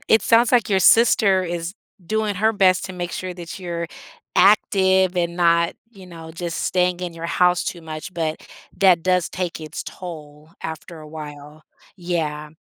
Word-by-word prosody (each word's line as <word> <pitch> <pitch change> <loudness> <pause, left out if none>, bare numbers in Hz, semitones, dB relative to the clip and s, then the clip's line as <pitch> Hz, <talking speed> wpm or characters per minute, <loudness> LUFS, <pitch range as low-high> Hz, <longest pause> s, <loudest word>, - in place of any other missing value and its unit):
it 220 -2 +5
sounds, 230 +1 +4
like, 240 -3 +3
your 195 - +3
sister 200 -4 +5
is 175 0 -4 0.3
doing 215 +1 -1
her 220 +3 +2
best 185 -3 +3
to 190 - -6
make 175 -1 -5
sure 185 -1 -5
that 175 0 -8
you're 170 -2 -4 0.5
active 190 -2 +4
and 170 -1 -1
not, 170 -1 +3 0.2
you 195 -5 -14
know, 165 -2 -10
just 170 0 -4
staying 180 -1 +1
in 180 -1 -4
your 165 0 -6
house 180 0 +2
too 175 - -4
much, 155 +3 -7
but 160 -2 -3 0.3
that 185 -3 +5
does 180 -1 +1
take 180 -3 -4
its 155 0 -6
toll 155 -3 -10
after 160 +1 -7
a 155 - -11
while, 150 0 -10 0.3
yeah. 155 -4 -3
175 Hz, 170 wpm, -21 LUFS, 165-190 Hz, 0.5 s, it